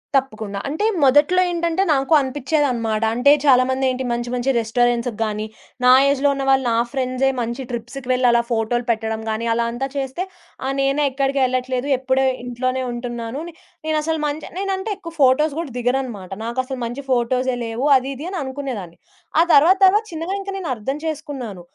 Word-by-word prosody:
తప్పకుండా. 215 -7 -1
అంటే 310 +9 -1 0.2
మొదట్లో 290 +7 +5
ఏంటంటే 340 +1 0
నాకు 275 +3 +1
అనిపిచేదన్నమాట. 260 -5 0
అంటే 245 +5 +4
చాలామంది 260 0 +4
ఏంటి 255 +1 -3
మంచి 240 0 -2
మంచి 250 +2 +1
రెస్టారెంట్స్‌కి 235 0 0
గాని, 215 -1 -2 0.4
నా 250 - +8 0.2
ఏజ్‌లో 280 0 +2
ఉన్నవాళ్ళు, 270 -1 +2
నా 230 - +2
ఫ్రెండ్సే 260 0 0
మంచి 235 +3 -3
ట్రిప్స్‌కి 245 +2 -6
వెళ్లి 250 0 +3
అలా 235 0 +4
ఫోటోలు 235 +1 0
పెట్టడం 220 -1 -2
గాని, 220 +2 -2
అలా 235 0 0
అంతా 255 +3 -3
చేస్తే 270 +6 -3 0.4
ఆ - - 0
నేనేక్కడికెళ్ళట్లేదు, 270 -2 0
ఎప్పుడు 260 +1 +1 0.2
ఇంట్లోనే 255 +1 -2
ఉంటున్నాను. 240 +2 -5 0.5
నేనసలు 310 +1 0 0.4
నేనంటే 390 +1 -2
ఎక్కువ 335 -4 -9
ఫోటోస్ 275 +3 +4
గూడా 330 -5 -4
దిగనన్నమాట. 245 -6 -2
నాకు 235 +2 -5
అసలు 260 -1 -5
మంచి 240 +4 -5
ఫోటోసే 255 +1 +1
లేవు 230 +4 -3
అది 260 +1 -4
ఇది 285 +5 -7
అని 385 - -4
అనుకునేదాన్ని. 260 -11 -6 0.4
ఆ - - +8
తర్వాత 325 +7 +6
తర్వాత 410 +3 +4
చిన్నగా 330 +4 -3
ఇంకా 395 0 -6
నేను 360 - -5
అర్థం 255 +6 -4
చేసుకున్నాను. 275 - -5
260 Hz, 155 wpm, -21 LUFS, 240-285 Hz, 0.5 s, నా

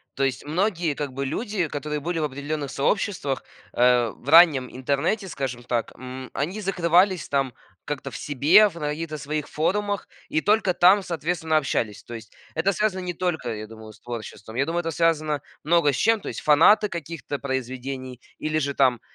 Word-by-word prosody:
То 135 - -1
есть 135 +1 -1
многие, 170 -1 0
как 145 -1 -4
бы, 140 +1 -3
люди, 205 - -2
которые 150 +1 -4
были 165 +3 -2
в 155 - -1
определённых 145 0 -3
сообществах, 145 -3 -1 0.3
э, 120 -1 +4
в 140 - -9
раннем 155 -6 +7
интернете, 140 - 0
скажем 130 -7 -4
так. 120 -2 -2
М, 130 +1 -8
они 180 +9 -3
закрывались 180 -1 +2
там 135 -3 0 0.3
как-то 145 -2 -4
в - - -9
себе, 155 +10 +5
в 175 - -16
на 150 - -2
каких-то 155 +1 -4
своих 150 +1 -3
форумах 200 +5 -1 0.2
и 155 - +1
только 205 -2 +2
там, 190 +3 +5
соответственно, 160 -1 -1
общались. 115 -7 -1
То 120 - -10
есть 110 -1 -11 0.2
это 170 +5 +2
связано 195 -1 0
не 180 -1 -3
только, 165 -9 -2
я 110 0 -6
думаю, 110 -1 -11
с - - -20
творчеством. 110 -2 -8
Я 135 +3 +1
думаю, 170 +2 -1
это 165 - -3
связано 155 -3 +1 0.2
много 165 -1 +3
с 135 - -3
чем. 225 +7 +2
То - - -5
есть - - -5
фанаты 185 +8 +5
каких-то 165 -3 -5
произведений 130 -1 -4 0.2
или 155 0 -1
же 140 -2 -1
там, 125 -4 +3
150 Hz, 185 wpm, -24 LUFS, 130-175 Hz, 0.3 s, раннем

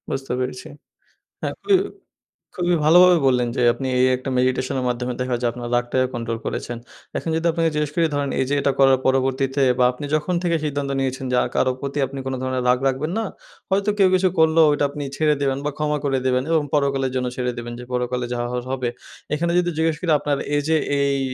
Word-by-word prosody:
বুঝতে 135 -1 -3
পেরেছি। 125 0 -4 0.7
হ্যাঁ, - - -3
খুবই 390 -2 +4 0.8
খুবই 175 -1 +1
ভালোভাবে 180 +3 +7
বললেন 125 -2 +2
যে - - +1
আপনি 135 - -4
এই 130 - +5
একটা 130 +1 -6
মেডিটেশনের 130 +1 0
মাধ্যমে 125 0 -2
দেখা 125 -1 0
যায় 120 - +2
আপনার 120 0 -6
রাগটাকে 120 +1 +1
কন্ট্রোল 115 -1 -3
করেছেন। 120 - -4 0.4
এখন - - -4
যদি 165 +1 -2
আপনাকে 165 0 +1
জিজ্ঞেস 150 -1 -1
করি 170 - +3
ধরেন 145 -1 -1
এইযে 135 +2 -1
এইটা 140 0 +2
করার 135 -1 +6
পরবর্তীতে 135 +1 +1 0.2
বা 125 - +5
আপনি 145 +4 -7
যখন 155 +4 -1
থেকে 170 -1 +1
সিদ্ধান্ত 145 -1 -2
নিয়েছেন 130 0 -2
যে - - +2
আর - - -3
কারো 130 - +2
প্রতি 140 +1 -3
আপনি 135 +1 -7
কোনো 130 0 -2
ধরনের 130 -1 -1
রাগ 125 0 +3
রাখবেন 135 +5 -1
না। 225 - -1 0.5
হয়তো 200 +2 +2
কেউ 190 -1 +6
কিছু 185 0 +3
করলেও 160 0 +5
ঐটা 145 0 +1
আপনি 145 +1 -6
ছেড়ে 155 -1 +3
দেবেন 135 -1 0
বা 150 - 0
ক্ষমা 150 0 0
করে 135 -1 +1
দেবেন 125 0 +1
এবং 160 -2 +3
পরকালের 135 -2 +1
জন্য 125 -1 0
ছেড়ে 125 -1 -1
দেবেন 120 0 -6
যে - - -7
পরকালে 125 0 -1
যা 120 - -3
হওয়ার 125 0 -3
হবে। 130 -2 -1 0.5
এখানে 170 +3 0
যদি 175 0 0
জিজ্ঞেস 160 0 +1
করি 175 -3 0
আপনার 145 -1 -1 0.2
এইযে 155 +2 +1 0.2
এই 140 0 +1
135 Hz, 210 wpm, -22 LUFS, 125-155 Hz, 0.8 s, ভালোভাবে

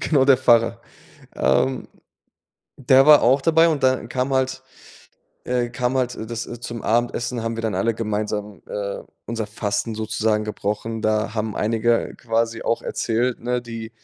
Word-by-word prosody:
Genau, 140 -4 +2
der 135 -2 +5
Pfarrer, 120 -3 +3 0.6
ähm, 130 -1 +1 0.9
der 135 +1 +5
war 150 -1 +8
auch 130 +4 +4
dabei 165 +2 +4
und 150 -4 -1
dann 130 -2 +2
kam 130 +2 -1
halt 130 0 0 0.8
äh, 125 -1 0
kam 125 +2 -1
halt, 125 -1 0
äh, 110 - -6
das 115 0 -4 0.2
zum 120 -1 -6
Abendessen 120 +1 0
haben 115 0 -3
wir 115 - -4
dann 110 -2 -1
alle 115 0 0
gemeinsam, 105 -3 -3
äh, 100 -1 -4 0.3
unser 115 -2 -3
Fasten 105 +1 -2
sozusagen 110 0 0
gebrochen. 105 +1 -3
Da 110 0 0
haben 110 -1 -2
einige 115 +2 +1
quasi 115 0 -1
auch 115 - -1
erzählt, 120 +2 -1
ne, 125 +1 -1
die 115 -1 -7
115 Hz, 160 wpm, -22 LUFS, 110-125 Hz, 0.9 s, war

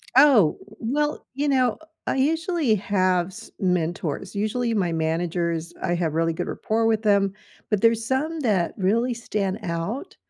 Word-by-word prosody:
Oh, 260 - +6 0.2
well, 295 +6 -1
you 290 +1 0
know, 255 -4 +3
uh, - - -15 0.3
I - - 0
usually 320 - +1
have 185 -3 +1
s 215 +4 -11
mentors. 175 -5 -1
Usually 230 +3 0
my 185 -5 +1
managers, 165 +1 -1
I 175 - +1
have 165 -3 -1
really 165 +1 +1
good - - -4
rapport 225 +1 -1
with 220 -1 +2
them, 200 -2 +3 0.4
but 210 -3 +1
there's 230 -1 +3
some 300 +6 -1
that 200 -9 +1
really 225 +6 +1
stand 210 -3 -2
out 170 - -4
210 Hz, 155 wpm, -24 LUFS, 175-245 Hz, 0.4 s, Oh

